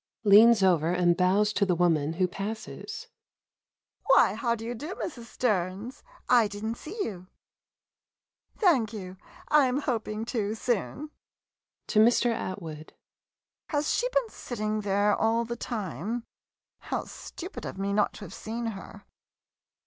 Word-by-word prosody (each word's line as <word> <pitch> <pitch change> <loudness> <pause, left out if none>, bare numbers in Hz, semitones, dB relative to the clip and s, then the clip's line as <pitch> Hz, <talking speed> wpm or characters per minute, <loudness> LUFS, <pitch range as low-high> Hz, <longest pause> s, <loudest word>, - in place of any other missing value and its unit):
[Leans 215 +1 +7
over 170 -4 +3
and 175 -1 +3
bows 195 +4 +3
to 205 - +1
woman 160 -3 +2
who 185 +2 +1
passes. 220 - -6 0.5
,] - - -55
Why, - - +6
how 235 -3 0
do 225 0 -8
you 240 - -3
do, 300 +10 -6
Mrs. 240 -8 -6
Stearns? 210 0 -2 0.3
I 240 -3 +5
did 205 +1 -7
n't 225 +1 -2
see 370 +9 -9
you. 185 -3 -6 1.3
Thank 265 - +3
you 190 -3 -7 0.2
— - - -19
I 300 -3 +5
am 255 +3 0
hoping 225 -4 -2
to, 220 -3 -2
soon. 250 +6 -2 0.7
[To 215 - +1
Mr. 235 +2 +5
A.] 170 -8 -5 0.8
Has 295 -1 0
she - - +1
been - - +1
sit 245 - -7
ting 215 -1 -1
there 205 +1 +2
all 230 +1 +1
the 235 +1 -4
time? 220 - -4 0.6
How - - -3
stupid 360 +3 -8
of - - -6
me 200 +1 -1
not 210 0 +2
to - - -11
have 185 - -10
seen 230 +2 -5
her! 200 +1 -11
215 Hz, 150 wpm, -28 LUFS, 195-240 Hz, 1.3 s, Leans